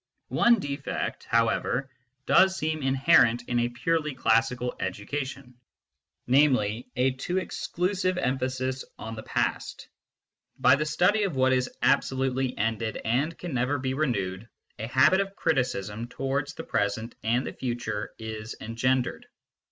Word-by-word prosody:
One 235 0 +4
defect, 140 -4 -4
however, 115 +3 +1 0.3
does 190 0 +5
seem 155 -2 -2
inherent 130 -3 +4
in 120 - +1
a 120 0 +1
purely 150 +4 -1
classical 120 +1 +1
education 130 +7 -4 0.7
namely, 125 -4 +3
a 130 +2 +2
too 130 +8 -3
exclusive 185 0 -1
emphasis 130 -2 -1
on 115 - -6
the 110 - -6
past. - - -2 0.7
By - - +6
the 150 +2 -2
study 180 +8 +3
of 195 -7 -1
what 130 0 +3
is 130 0 +1
absolutely 130 -1 +1
ended 110 +1 -1
and 135 +9 0
can 175 -4 -6
never 125 +3 +1
be 130 0 -2
renewed, 115 -8 -2 0.3
a 110 - -3
habit 130 +10 +4
of 195 0 -5
criticism 115 - -1
towards 135 +3 -3
the - - -6
present 110 +3 -1
and 120 +4 +1
the - - -5
future 120 -4 -3
is 110 0 -6
engendered. 125 +3 -1
130 Hz, 135 wpm, -27 LUFS, 115-145 Hz, 0.7 s, By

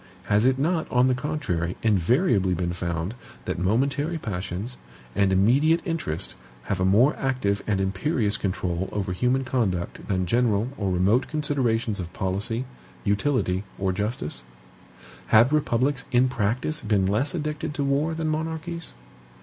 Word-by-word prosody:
Has 105 +4 +3
it 130 0 +3
not, 160 +4 0
on 125 0 +4
the 130 - +3
contrary, 125 - -2
invariably 105 - +3
been 85 0 -2
found 85 +2 -3 0.3
that - - -2
momentary 140 - +1
passions, 100 - -4 0.4
and 100 -1 +3
immediate 135 - +4
interest, 150 - -2 0.3
have 95 +8 -2
a 95 - +2
more 115 +10 +4
active 125 -7 0
and 100 -3 +1
imperious 105 +3 0
control 95 -3 -2
over 95 -3 -2
human 125 +7 +1
conduct 105 -10 -2
than 95 -2 0
general 115 +2 +2
or 100 -7 -1
remote 95 +8 +2
considerations 125 -8 0
of 85 -1 -5
policy, 105 +6 -2 0.4
utility 100 -3 +1
or 95 -1 0
justice? 105 - -2 0.9
Have 115 +6 +5
republics 135 -2 +1
in 125 0 +4
practice 125 +7 -1
been 105 -3 +1
less 110 - +1
addicted 150 -1 -3
to 140 - -1
war 145 +4 +1
than 160 -1 -2
monarchies? 160 - -3
115 Hz, 140 wpm, -25 LUFS, 95-140 Hz, 0.9 s, Have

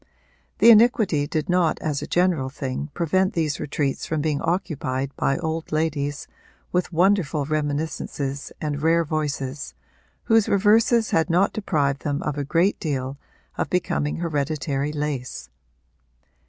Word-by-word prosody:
The 235 - +8
iniquity 210 -10 +4
did 155 0 -2
not 180 -3 +2
as 150 -3 -2
a - - -5
general 175 -7 +1
thing 135 +2 -4
prevent 185 +4 +1
these 155 -4 -1
retreats 140 -1 -2
from 160 - -1
being 150 -1 -1
occupied 140 -6 -2
by 135 - +1
old 160 -1 -3
ladies 145 -2 -1 0.4
with 180 0 0
wonderful 170 -4 +2
reminiscences 145 -2 -3
and 145 -2 -3
rare 165 +2 +3
voices, 145 -2 -3 0.5
whose 225 -2 +3
reverses 220 +3 +3
had 165 +2 +2
not 180 +4 +3
deprived 145 -9 0
them 145 0 -2
of 150 - -2
a 145 - -2
great 170 +7 +1
deal 135 -3 -3 0.4
of - - -1
becoming 160 -4 0
hereditary 150 -3 -2
lace. 145 - -4
155 Hz, 135 wpm, -23 LUFS, 145-175 Hz, 0.5 s, The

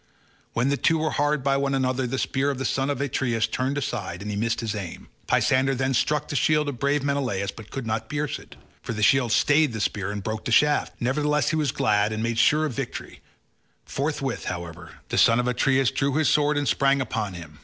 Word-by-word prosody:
When 125 +4 +1
the 140 - +1
two 165 - +2
were 155 -1 -1
hard 145 -1 0
by 135 0 +2
one 140 0 0
another 130 -1 0
the 135 +2 -3
spear 135 +1 0
of 140 - -2
the 135 - -3
son 135 +1 0
of 140 -1 -2
Atreus 120 -4 0
turned 130 +5 -2
aside 105 -9 -4
and 105 - -4
he - - -3
missed 115 +3 -1
his 110 -3 -2
aim; 100 -5 -7 0.2
Pisander 135 +1 +2
then 130 +1 0
struck 150 +3 +1
the - - -5
shield 150 +1 +2
of 130 -4 -6
brave 140 0 +1
Menelaus 130 -9 -1
but 110 0 -12
could 135 -3 -5
not 110 0 -3
pierce 145 0 -2
it, - - -15 0.3
for - - -5
the 105 -1 -2
shield 125 0 +4
stayed 145 +2 +3
the 110 - -4
spear 100 -1 -1
and 105 -1 -4
broke 110 +1 -4
the - - -2
shaft; 150 +4 +3
nevertheless 150 +3 +1
he 160 - 0
was 150 -5 +1
glad 105 0 +1
and 110 +1 -3
made 115 0 -1
sure 155 +5 +4
of 150 - -3
victory; - - -6 0.6
forthwith, 140 -3 -3
however, 85 -1 -6 0.2
the - - +1
son 115 +1 +5
of 125 - 0
Atreus 130 +1 +2
drew 135 0 0
his 155 -1 +2
sword 150 0 +2
and 145 -1 0
sprang 140 +1 +3
upon 110 -6 -3
him. 80 -3 -11
130 Hz, 230 wpm, -25 LUFS, 110-145 Hz, 0.6 s, son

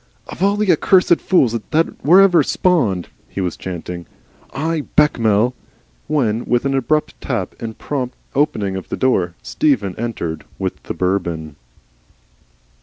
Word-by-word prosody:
"Of - - -9
all 200 +1 +3
the 210 -3 +3
accursed 180 +1 +4
fools 135 - +3 0.2
that 165 +1 0
were 180 +7 +7
ever 190 -3 +5
spawned," 120 - +1 0.2
he - - -6
was 90 -3 -1
chanting, 90 -1 -6 0.4
"I, 155 +3 -1
Bechamel 115 -5 +3 0.3
" - - -38
when 120 -7 0
with 120 +2 +1
an 135 - +1
abrupt 135 +4 0
tap 115 -9 -3
and 110 -1 -6
prompt 130 -4 -3 0.2
opening 110 -9 0
of 95 - -6
the - - -3
door, 90 -10 +1
Stephen 100 - +1
entered 105 -9 -3
with - - -4
the - - -6
Bourbon. 85 -4 -2
120 Hz, 145 wpm, -19 LUFS, 95-150 Hz, 0.4 s, were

